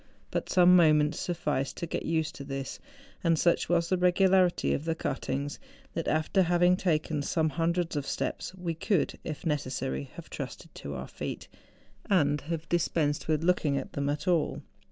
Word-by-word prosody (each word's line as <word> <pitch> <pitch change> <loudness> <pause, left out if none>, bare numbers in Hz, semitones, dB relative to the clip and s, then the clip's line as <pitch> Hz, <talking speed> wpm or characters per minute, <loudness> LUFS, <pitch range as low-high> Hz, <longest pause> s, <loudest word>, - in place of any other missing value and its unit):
But - - -2
some 180 0 +6
moments 155 -3 +4
sufficed 150 -6 -2
to - - -3
get 165 - -4
used 160 -1 0
to 140 - -8
this; 135 -1 -5 0.4
and 165 -2 +3
such 170 +2 +2
was 170 -1 +2
the 185 - +1
regularity 185 0 +3
of 145 - -2
the 165 0 0
cuttings, 140 -1 -3 0.3
that, 165 - -3
after 155 +5 +2
having 175 0 +4
taken 155 -4 0
some 160 +2 +1
hundreds 165 +3 0
of 140 -2 -2
steps, - - -3
we 175 -2 -3
could, 170 +1 0
if 155 +2 -6
necessary, 130 - -2
have - - -10
trusted - - -7
to 70 0 -7
our - - -5
feet, - - -6 0.6
and 150 -6 +3
have 165 +1 -4
dispensed 155 -3 0
with 155 0 +1
looking 165 -5 +2
at 135 - -5
them 140 0 -1
at 145 +5 -3
all. 170 -4 +1
160 Hz, 175 wpm, -29 LUFS, 145-175 Hz, 0.6 s, some